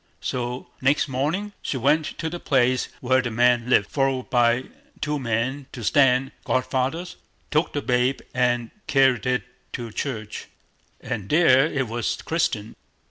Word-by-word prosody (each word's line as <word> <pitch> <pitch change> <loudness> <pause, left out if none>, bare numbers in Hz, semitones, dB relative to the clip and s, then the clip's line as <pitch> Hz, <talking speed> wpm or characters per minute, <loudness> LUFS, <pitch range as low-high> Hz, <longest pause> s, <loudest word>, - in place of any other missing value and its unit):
So 125 0 -3
next 135 +4 +2
morning 155 +11 -2
she 130 - -3
came 145 +6 +3
to 155 +1 -5
the 175 +2 -5
place 130 -4 +2
where 130 +1 +3
the 125 - -3
man 120 +1 +2
lived, 100 - +4
followed 135 -2 0
by 120 0 +3 0.4
two 150 -1 -1
men 130 +3 -2
to 120 - -7
stand 135 +1 +3
godfathers, 135 +7 -1 0.3
took 155 +3 +1
the 145 - -2
babe 125 +2 +1
and 120 -2 +1 0.2
carried 130 -4 +3
it 125 0 +1 0.3
to 120 -2 -5
church, 110 -3 -5 0.5
and 110 -5 -5
there 150 -3 +5
it 135 -5 -2
was 115 0 -2
christened. 160 -10 -1
130 Hz, 145 wpm, -24 LUFS, 120-145 Hz, 0.5 s, there